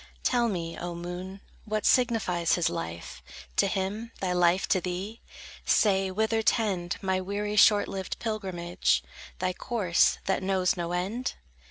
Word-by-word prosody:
Tell 240 -2 +2
me, 170 -4 -3
O 175 0 -4
moon, 180 +3 -6 0.2
what 215 0 -2
signifies 215 -9 +2
his 175 - +2
life 85 0 -6 0.4
To - - +4
him, 200 +4 -2
thy 185 -2 -1
life 180 +1 +3
to 185 - +3
thee? 185 +5 -5 0.4
Say, 195 -2 +3
whither 220 +3 +1
tend 195 -6 0
My 190 -1 +1
weary, 205 +2 -3
short 210 0 +6
lived 190 -1 -4
pilgrimage, 175 - -1 0.3
Thy 185 0 -1
course, 185 -4 +2
that 190 - 0
knows 190 -1 +1
no 175 -1 -3
end? 195 +8 -2
190 Hz, 145 wpm, -28 LUFS, 175-210 Hz, 0.4 s, short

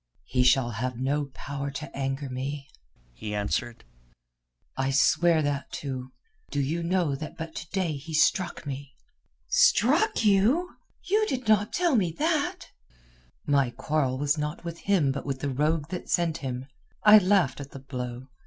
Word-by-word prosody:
"He 125 -1 0
shall 125 -1 +4
have 120 +3 -3
no 140 +3 0
power 140 0 -5
to 140 +1 -7
anger 135 +1 -2
me," 135 +2 -5 0.5
he 105 - -5
answered. 115 +3 -2 0.9
"I 135 0 0
swear 155 +4 +3
that 145 -1 -2
too. 130 -2 -5 0.4
Do - - -2
you 150 +5 -1
know 170 -3 +1
that 155 +2 -7
but 160 0 -6
to 160 - -7
day 185 -4 -1
he 155 +3 -6
struck 170 +3 +2
me?" 140 0 -6 0.5
"Struck 300 - +3
you? 220 - +3 0.3
You 425 +3 +2
did 255 - -3
not 215 0 +3
tell 350 -5 +2
me 185 -7 +2
that!" 310 -1 -1 0.7
"My 140 -3 +3
quarrel 130 +1 -1
was 145 +2 +1
not 150 +3 -4
with 170 0 -6
him 180 -9 +2
but 135 - -4
with 135 -2 -3
the 140 - -1
rogue 150 +3 0
that 180 - -6
sent 170 -2 +1
him. 130 -1 -5 0.4
I 215 0 +9
laughed 185 -9 +2
at 140 - -8
the - - -10
blow. 125 -2 -6
145 Hz, 160 wpm, -27 LUFS, 135-180 Hz, 0.9 s, I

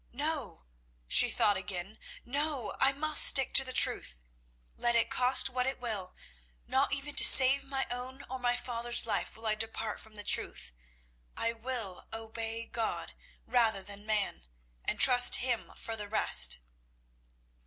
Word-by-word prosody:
"No," 285 - -5 0.4
she 245 - +6
thought 215 -4 0
again, 190 +2 -8 0.3
"no, 280 -2 -4
I 270 - +4
must 305 +2 +4
stick 270 -2 +6
to 270 - +3
the 260 - -9
truth. - - 0 0.5
Let 240 0 -1
it 230 - -1
cost 255 +1 +1
what 255 -1 -4
it 265 - -6
will, 215 -7 -6 0.5
not 270 +1 -2
even 280 +1 -5
to - - +4
save 270 +1 +8
my 270 -1 -6
own 255 +2 -9
or 260 0 -8
my 245 -1 -2
father's 240 -1 -1
life 215 -1 -5
will 225 - -14
I 215 - -1
depart 220 0 -6
from 220 -1 -19
the 205 - -8
truth. - - -2 0.6
I 230 - -3
will 225 -5 -8
obey 225 0 -7
God 230 -1 -7 0.3
rather 225 -5 -1
than 205 +1 -12
man, 205 - -4 0.4
and - - -5
trust 245 -2 +7
Him 245 -2 -4
for 225 - -8
the 210 -2 -8
rest." 215 - +3
235 Hz, 155 wpm, -28 LUFS, 215-260 Hz, 0.6 s, save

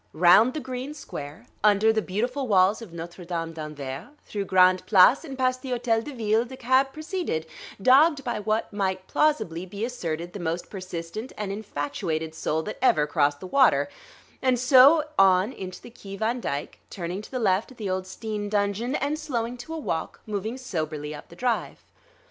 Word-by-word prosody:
Round 180 - +6
the - - -1
green 260 +2 -6
square, 145 - -8 0.2
under 210 +1 +5
the 220 - +1
beautiful 245 +8 -2
walls 195 +1 +4
of 220 -6 -10
Notre 170 +2 -8
Dame 165 -1 -4
d'Anvers, 145 -4 -6 0.2
through 200 -2 -4
Grande 185 -1 +4
Place 210 - +6
and 275 -5 -7
past 255 -1 +1
the 265 - -7
Hôtel 235 -2 0
de 295 - -7
Ville, 220 -1 +2
the 260 +2 -10
cab 260 +2 +2
proceeded, 310 - -3 0.3
dogged 275 +6 +5
by 240 -4 -2
what 215 +1 -1
might 190 -2 -1
plausibly 185 - +1
be 200 +4 -4
asserted 175 -8 -4
the 205 - -6
most 170 0 -3
persistent 185 +4 -6
and 210 -2 -3
infatuated 160 -4 -3
soul 160 0 -1
that 210 - -6
ever 155 - +4
crossed 145 -2 +1
the - - -7
water; 265 +8 +3 0.5
and 255 -2 +2
so 265 +5 +7 0.2
on 190 +4 +5
into 185 -1 -7
the 240 - -13
Quai 195 -4 -9
Van 230 +4 0
Dyck, 145 -10 -4
turning 180 +1 -5
to - - -12
the 260 - -4
left 200 -3 +1
at 260 - -15
the 210 - -4
old 185 0 -2
Steen 210 +1 -5
dungeon 205 +5 0
and, 290 +2 -1
slowing 245 -6 -3
to 245 +6 -9
a 325 - -3
walk, 165 - -3
moving 215 +3 -3
soberly 155 - -4
up 145 - -10
the 170 - -13
drive. 240 +3 -2
210 Hz, 185 wpm, -26 LUFS, 175-250 Hz, 0.5 s, so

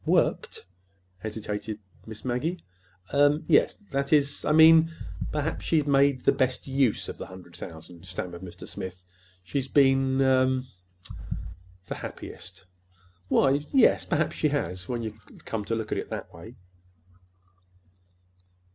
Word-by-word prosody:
"Worked?" - - +1 0.5
hesitated 105 0 -4 0.3
Miss 110 +1 -9
Maggie. 150 +8 -2 0.5
"Er—that 145 +1 +2
is, 145 -2 +2
I - - +1
mean, 160 +1 +7 0.4
perhaps 150 +1 -2
she's 155 -3 +2
made 140 -2 +3
the - - +4
best 130 -2 0
use 135 -4 +1
of - - -7
the - - -6
hundred 90 -2 -12
thousand," 85 +2 -10
stammered 90 -1 -5
Mr. 90 -1 -9
Smith. 90 -1 -7 0.4
"She's 135 +7 -2
been—er—the 130 -1 +3 1.3
happiest." 95 +1 -9 0.6
"Why, 135 - +4
y 145 +2 0
yes, 265 -4 +5
perhaps 155 -2 0
she 155 - +2
has, 95 - -2
when 120 -2 -2
you 110 - -3 0.3
come 110 -2 -3
to 115 - -1
look 110 -1 -4
at - - 0
it - - -6
that - - -6
way." 110 +9 -11
130 Hz, 125 wpm, -27 LUFS, 105-145 Hz, 1.3 s, mean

